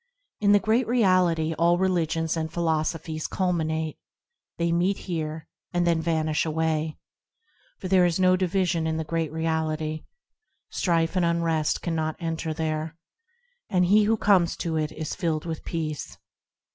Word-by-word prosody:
In 205 -1 +3
the 205 - +7
Great 225 +4 +1
Reality 185 -8 +3
all 170 +1 +4
religions 165 -3 0
and 160 -1 -3
philosophies 160 -1 -1
culminate, 160 -4 -1 0.6
They 170 0 0
meet 180 +4 +1
here, 160 -3 -4 0.3
and 175 0 +1
then 170 -1 +2
vanish 155 -2 0
away, 160 -1 -1 0.8
For 185 - -6
there 185 -1 +4
is 170 +1 -1
no 185 0 +5
division 180 -2 0
in 160 0 -1
the 160 - -1
Great 165 -1 -2
Reality, 155 -1 -2 0.7
Strife 165 -1 +1
and 180 - +2
unrest 165 -2 0
cannot 160 -2 -1
enter 165 -1 -3
there, 155 0 -3 0.7
And 180 -1 +3
he 205 +3 +5
who 225 +1 +2
comes 190 -5 +3
to 165 -2 -2
it 155 -1 -1
is 155 -1 -5
filled 160 -2 -2
with 160 -2 -5
peace. 155 -3 -4
165 Hz, 145 wpm, -26 LUFS, 160-180 Hz, 0.8 s, the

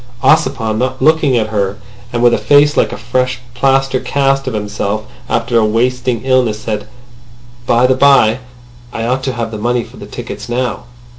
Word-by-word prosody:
Ossipon, 110 -4 +2
not 130 +1 -2
looking 155 -5 +3
at 110 -1 0
her, 100 -2 -1 0.3
and 120 0 -1
with 120 -1 +5
a - - +1
face 145 +1 +4
like - - +2
a - - -6
fresh 125 +3 -1 0.2
plaster 135 +1 +1
cast 135 0 0
of 125 - -2
himself 105 0 -3 0.2
after 115 0 +1
a - - +2
wasting 120 +2 0
illness, 130 -5 +2
said: 105 -2 -4 0.8
"By 120 +2 +3
the 130 - +4
by, 130 -4 +4 0.5
I 115 - -4
ought 125 +2 0
to 130 - -1
have 115 -2 -4
the 110 - -6
money 120 +2 0
for - - -15
the - - -10
tickets - - -8
now." 120 -1 -2
120 Hz, 180 wpm, -15 LUFS, 110-130 Hz, 0.8 s, with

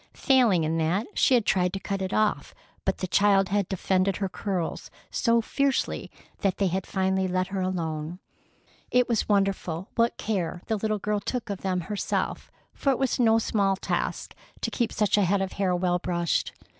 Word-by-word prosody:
Failing 240 - +4
in 160 +1 0
that, 170 +7 +1
she 260 - +4
had 235 -4 +2
tried 180 -1 +2
to 195 - -2
cut 195 0 -3
it 190 0 -2
off, 215 -1 0 0.3
but - - 0
the 185 - -3
child 195 0 +3
had 200 -1 0
defended 190 0 +1
her 195 - -1
curls 185 -2 -3 0.2
so 235 -1 +2
fiercely 275 +4 -1 0.3
that 195 -2 0
they 200 - +1
had 185 +1 -1
finally 190 0 0
let 185 0 -1
her 195 -1 -2
alone. 165 -3 -3 0.7
It 250 0 +3
was 230 -3 0
wonderful 195 -3 0
what 230 0 +1
care 180 -5 -2
the 220 - 0
little 215 +1 -1
girl 210 +1 -1
took 235 +1 -3
of 195 - -4
them 185 -2 -1
herself, 205 +4 -3 0.2
for 275 - -1
it 270 - +3
was 265 -2 0
no 225 -2 +5
small 200 -3 +1
task - - -3 0.3
to - - -1
keep 235 -3 0
such 210 -1 +2
a - - +4
head 195 +2 +2
of 190 -1 -2
hair 190 -2 0
well 180 0 +1
brushed. 175 -2 -1
195 Hz, 190 wpm, -26 LUFS, 185-215 Hz, 0.7 s, no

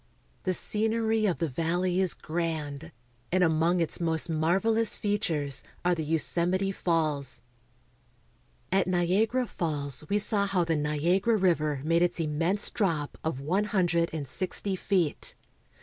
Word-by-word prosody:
The 185 - +1
scenery 220 +1 +2
of 180 - 0
the 165 - -1
valley 175 +5 0
is 185 -3 +2
grand, 155 -3 -4 0.4
and 185 +1 +3
among 165 +2 +2
its 165 - 0
most 165 0 +1
marvelous 195 +8 +2
fea 205 0 -1
tures 145 -6 -1 0.2
are 180 - +3
the 160 -2 -2
Yosemite 175 +5 +1
Falls. 150 -9 -1 1.3
At 190 0 +2
Niagara 190 +8 +1
Falls 145 - -3
we 205 - +2
saw 205 -1 +2
how 190 -3 +1
the 165 -1 0
Niagara 170 +9 +1
River 155 -7 +1
made 165 +2 +2
its 175 0 +1
immense 165 +5 0
drop 165 -9 -1
of 155 -4 -3
one 185 +9 0
hundred 175 -5 +1
and 150 -3 -5
sixty 190 +6 -1
feet. 185 -5 -1
170 Hz, 140 wpm, -28 LUFS, 155-195 Hz, 1.3 s, and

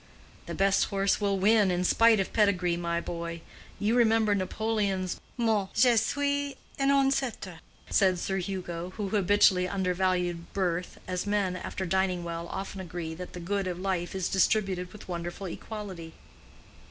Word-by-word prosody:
"The - - -4
best 195 0 +3
horse 195 +1 0
will 200 -1 +1
win 205 +1 +4
in 180 0 0
spite 230 +3 +5
of 195 - -2
pedigree, 185 -5 +2
my 170 0 -1
boy. 170 -1 -5 0.4
You 215 +2 +1
remember 225 -3 +4
Napoleon's 200 -1 -1 0.2
mot—Je 225 +1 +3
suis 285 +4 0 0.2
un 275 0 +2
ancêtre" 270 -10 +1 0.3
said 190 -3 +3
Sir 190 +2 -2
Hugo, 180 -2 -4
who 205 -2 -2
habitually 195 -2 +4
undervalued 180 -2 -1
birth, 180 -2 -1
as 185 +2 -3
men 200 -3 +1
after 190 +1 -4
dining 185 -1 0
well 170 0 -5
often 195 +1 -5
agree 170 -2 -5
that 180 +2 -8
the 180 - -6
good 195 +2 -2
of 180 -1 -3
life 185 -2 -2
is 190 -2 -1
distributed 190 -2 +1
with 210 - -12
wonderful 175 +2 -5
equality. 185 -3 -7
190 Hz, 150 wpm, -28 LUFS, 180-210 Hz, 0.4 s, spite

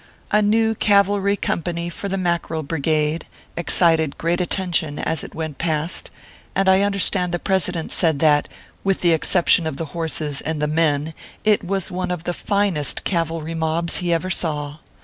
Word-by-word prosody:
A 210 - +4
new 220 +2 +3
cavalry 200 -1 +3
company, 170 -1 -2
for 185 +3 -5
the 195 - -1
Mackerel 170 -3 -1
Brigade, 155 +1 0 0.3
excited 165 -3 +2
great 170 +2 0
attention 175 -4 0
as 160 -2 -1
it - - -10
went 160 -3 -5
past, 160 0 0 0.5
and 195 0 +1
I 190 +1 +5
understand 200 -2 +1
the 175 - 0
President 180 -3 -1
said 160 -4 +2
that, 150 0 +3 0.3
with 195 -1 0
the 175 -2 +4
exception 170 0 +3
of 140 - -4
the 165 - -3
horses 155 -3 -1
and 160 -1 -3
the 150 - +1
men, 155 0 +1 0.3
it 210 -2 +3
was 190 +1 -2
one 180 0 -3
of 180 -2 -3
the 175 - -2
finest 200 -8 -1
cavalry 165 -2 -2
mobs 165 +1 -1
he 175 -2 -1
ever 170 +3 0
saw. 150 -5 -2
170 Hz, 170 wpm, -21 LUFS, 160-190 Hz, 0.5 s, I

